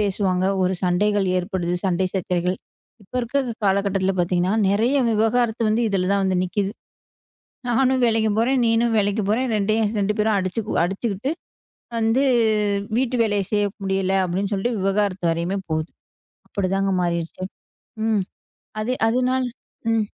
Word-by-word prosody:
பேசுவாங்க, 190 -2 0 0.2
ஒரு 185 +1 +1
சண்டைகள் 200 +2 +2
ஏற்படுது, 180 -1 -2
சண்டை 185 0 +1
சச்சரவுகள் 180 0 -1 0.5
இப்ப 190 - -25
இருக்கிற 270 +4 0 0.2
காலகட்டத்துல 195 -1 +1
பார்த்தீங்கன்னா 180 +2 +1 0.2
நிறைய 225 +7 +2 0.2
விவாகரத்து 225 +1 +1
வந்து 230 +2 +2
இதுல 185 -1 0
தான் 200 - +2
வந்து 185 -1 +1
நிக்குது. 195 +2 -1 1.0
நானும் 255 +1 +2
வேலைக்கு 220 -1 +2
போறேன், 255 +3 +2
நீயும் 230 0 +2
வேலைக்கு 205 +1 +1
போறேன், 250 +4 +1
ரெண்டயு 215 +2 +1 0.2
2 205 +1 +1
பேரும் 210 -1 +2
அடிச்சு 185 +4 -2 0.2
அடிச்சுக்கிட்டு 200 +6 -2 0.7
வந்து 225 +4 +2 0.8
வீட்டு 255 0 0
வேலையை 205 -3 +1
செய்ய 205 -1 +2 0.2
முடியல 190 0 0
அப்படின்னு 190 +3 -2
சொல்லிட்டு 215 +3 -1
விவாகரத்து 195 -2 0
வரையுமே 170 +4 -1
போகுது. 155 +1 -1 0.6
அப்படித்தாங்க 195 0 0
மாறிடுச்சு. 170 +1 -2 0.6
ம். 215 -3 +2 0.6
அது 240 +4 -1 0.2
அதனால 255 +2 +1 0.5
ம். 220 -2 +1
200 Hz, 130 wpm, -22 LUFS, 185-225 Hz, 1.0 s, சண்டைகள்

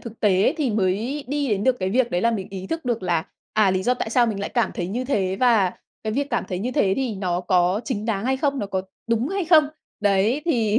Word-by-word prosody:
thực 230 -1 -10
tế 205 - +3
thì 280 -6 0
mới 215 +8 -1
đi 285 -1 -1
đến 205 -1 0
được 260 -1 +3
cái 185 0 0
việc 245 +1 +2
đấy 175 - 0
là 235 - +3
mình 205 -5 -3
ý 190 -1 -6
thức 325 +6 -4
được 235 -4 -1
là, 170 -2 0 0.3
à, 210 -3 +4
lý 185 0 0
do 250 +5 +2
tại 220 - -4
sao 240 0 +4
mình 205 -3 -2
lại - - -2
cảm 235 -5 +1
thấy 175 - -3
như 245 +6 -3
thế 195 -8 0
và 220 -7 +4 0.3
cái 215 - -1
việc 280 +3 -1
cảm - - 0
thấy 180 - -3
như 235 +7 -2
thế 205 -10 +2
thì 260 -5 -1
nó 180 -2 -1
có 180 +2 +2
chính 215 -5 -3
đáng 220 -2 -1
hay 265 +1 +1
không, 280 0 0
nó 205 - -2
có 190 -1 -2 0.2
đúng 230 +3 0
hay 390 -1 -1
không. 310 -3 +5 0.3
Đấy, 205 +7 +2
thì 230 -9 +2
220 Hz, 265 wpm, -23 LUFS, 190-255 Hz, 0.3 s, không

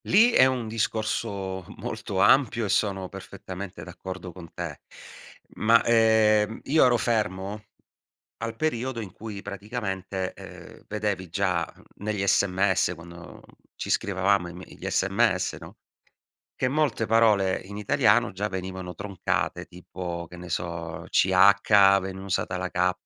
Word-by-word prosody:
Lì 225 +6 +5
è 130 - +6
un 125 -3 -2
discorso 105 -3 -2
molto 95 - -4
ampio 120 +2 +4
e - - -3
sono 95 -1 0
perfettamente 95 0 -8
d'accordo 95 -1 -8
con 85 -2 -12
te, - - -6 0.8
ma, 115 +2 +5
ehm, 110 -2 +3
io 155 0 +4
ero 125 -1 +4
fermo 105 -2 -2 0.8
al 115 0 -4
periodo 125 -2 -2
in 105 -4 -7
cui 100 0 -8
praticamente, 95 -3 -4
ehm, - - -12
vedevi 105 -3 -2
già, 90 -3 0
mhmm, - - -20 0.2
negli 105 -2 -1
SMS 95 -2 +2
quando 85 0 -12 0.3
ci - - -6
scrivevamo 95 -1 +1
i - - -8
me 90 +2 -9
gli - - -7
SMS, 95 0 +1
no, - - -13 0.8
che 130 - -1
molte 140 -4 +1
parole 105 -4 +3
in 100 +2 -9
italiano 105 -2 +3
già 100 +3 -2
venivano 95 -1 -5
troncate, 95 -2 -2
tipo, 90 -1 -7
che 90 - -12
ne 90 0 -9
so, 85 -1 -4
CH, 100 +1 +5
veniva 95 0 -6
usata 90 -1 -1
la 90 0 -3
K 90 +1 +2
100 Hz, 140 wpm, -26 LUFS, 90-110 Hz, 0.8 s, è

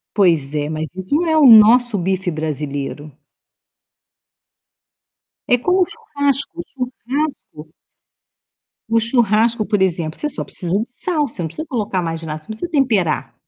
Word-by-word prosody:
Pois 165 -8 +2
é, 145 0 -1
mas 155 0 -4
isso 280 - -1
é 320 -1 +1
o 300 -3 +6
nosso 230 0 +7
bife 190 +1 -1
brasileiro. 150 -1 -4 2.4
É 245 - +5
como 360 +9 +1
o - - +5
churrasco. 285 -2 -2
O 345 - -6
churrasco 260 - -4 1.3
o 230 0 +2
churrasco, 225 -1 +1
por 205 -2 0
exemplo, 165 -4 0
você 300 - -2
só - - -3
precisa 175 -2 -3
de 215 +3 +1
sal. 305 -5 -1
Você 205 - -7
não - - -2
precisa 310 - -7
colocar 205 - -2
mais 165 -1 -4
nada. 155 -1 -5
Você - - -18
não 220 0 -7
precisa 345 - -5
temperar 220 - 0
215 Hz, 150 wpm, -19 LUFS, 165-265 Hz, 2.4 s, nosso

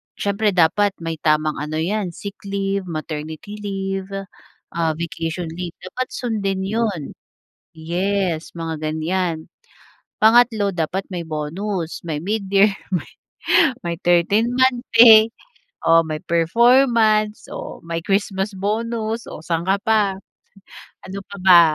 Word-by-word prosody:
siyempre 205 0 0
dapat 190 +4 +3
may 165 -1 -4
tamang 155 0 +1
ano 150 +1 -4
'yan, 180 +2 -2
sick 200 0 -8
leave, 195 -1 -2
maternity 155 +5 -6
leave, 195 -2 -3 0.6
ah, 165 -2 0
vacation 165 0 -4
leave, 175 0 -6
dapat 250 +8 -4
sundin 200 -5 -2
'yon. 205 -6 -2 0.6
Yes, 175 +1 -2
mga 165 -1 -4 0.2
ganyan. 165 0 -2 0.7
Pangatlo, 220 -2 +5
dapat 175 +1 -2
may 180 -2 -4
bonus, 165 +3 -4
may 155 -3 -2
mid-year, 200 +1 +2 0.2
may 175 - -3 0.7
may 170 -1 -3
13 200 +7 +3
month 260 -1 +2
pay 225 -1 +8 0.5
o 165 0 +6
may 155 -1 -3
performance 220 +4 +3
o - - -7
may 165 0 -3
Christmas 195 +1 0
bonus 225 +3 -2
o 155 - -9
saan 165 -1 0
ka 195 +1 +3
pa? 210 -3 +2 0.9
Ano 195 +1 -6
pa 200 - -9
ba 180 -2 +8
190 Hz, 120 wpm, -21 LUFS, 165-215 Hz, 0.9 s, pay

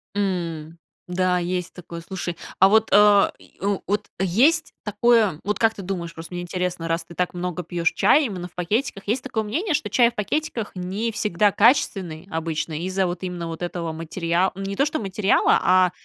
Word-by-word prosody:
М, 170 -5 -3 0.3
да, 180 0 +1
есть 180 0 -3
такое. 170 -1 -9
Слушай, 175 -1 -5 0.2
а 190 - +8
вот 220 +1 +4
а 205 -1 +6
и - - -21
в 200 0 0
вот 205 +1 -1
есть 260 - +2
такое, 210 -5 +2
вот, 210 0 -2
как 225 -1 +3
ты 200 - -7
думаешь, 175 -3 -4
просто 165 +2 -10
мне 175 - -3
интересно, 180 -1 -3
раз 165 0 -1
ты 170 - -12
так 180 0 -1
много 180 0 -3
пьёшь 170 +1 0
чай 300 - +4
именно 185 -6 -5
в 180 - -24
пакетиках, 200 +4 -2
есть 240 +5 0
такое 225 -4 -2
мнение, 320 - -1
что 300 - -2
чай 235 -2 +4
в - - -15
пакетиках 230 0 -2
не 195 +5 -3
всегда 210 -1 +1
качественный 195 - +2
обычно 160 -1 -3
из-за 185 +2 0
вот 175 +1 -4
именно 175 -2 -4
вот 165 0 -7
этого 175 -2 -3
материал 170 +3 -1
не 195 0 -4
то 275 - +3
что 305 +1 -2
материала, 195 0 +2
а 185 -1 +4
185 Hz, 190 wpm, -23 LUFS, 175-210 Hz, 0.3 s, а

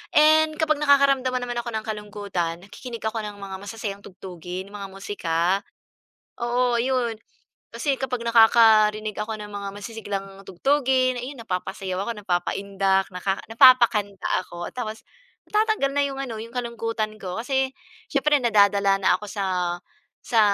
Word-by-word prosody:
And 310 +1 +5
kapag 310 -1 +1
nakakaramdaman 275 -3 +3
naman 245 -1 -3
ako 235 - -4
ng 220 - -2
kalungkutan, 205 -5 -4
nakikinig 230 +3 -9
ako 220 +1 -1
ng 210 -1 -6
mga 190 -1 -6
masasayang 205 0 -6
tugtugin, 185 +1 -8
'yung 205 - -8
mga 195 - -5
musika. 190 -4 -3 1.0
Oo 240 0 +1
ayun, 245 -2 0 0.6
kasi 280 -3 0
kapag 250 -3 -3
nakakarinig 220 -2 +5
ako 215 +1 -3
ng 210 0 -8
mga 200 -1 -5
masisiglang 205 -2 -5 0.2
tugtugin, 255 +4 +1
ayun 255 +1 -7
napapasayaw 185 -1 -3
ako, - - 0
napapaindak, 195 +1 0
naka 190 +2 -1 0.2
napapakanta 225 -5 +5 0.2
ako. 175 0 -6
Tapos 220 -3 -5 0.5
natatanggal 425 -9 +2
na 285 - +3
yung 270 -1 -6
ano, 230 -4 -5
yung 230 +1 -10
kalungkutan 230 -3 -3
ko, 180 -1 -5
kasi 265 +2 0 0.4
siyempre 290 0 +3
nadadala 200 -3 +4
na 185 - +4
ako 210 - -8
sa 200 -2 -2 0.8
sa 230 -2 +2
220 Hz, 140 wpm, -24 LUFS, 200-255 Hz, 1.0 s, And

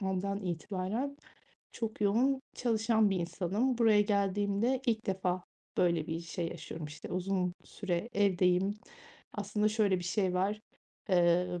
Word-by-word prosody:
andan 195 +1 -1
itibaren 195 - -3 0.6
çok 220 -2 -4
yoğun 245 +7 +3
çalışan 220 -2 +2
bir 195 - +1
insanım. 200 +9 0
Buraya 220 -3 +5
geldiğimde 205 +4 +1
ilk 225 -2 0
defa 185 -2 -1 0.3
böyle 170 -3 +2
bir 165 0 -3
şey 170 0 -3
yaşıyorum, 165 -2 -7
işte, 150 0 -9
uzun 185 0 0
süre 185 +1 -3
evdeyim. 190 0 +3 0.6
Aslında 210 +1 0
şöyle 210 -3 +2
bir 175 - -6
şey 185 0 0
var. 200 +3 0 0.5
Emm, 175 -1 +3
195 Hz, 130 wpm, -32 LUFS, 180-215 Hz, 0.6 s, Buraya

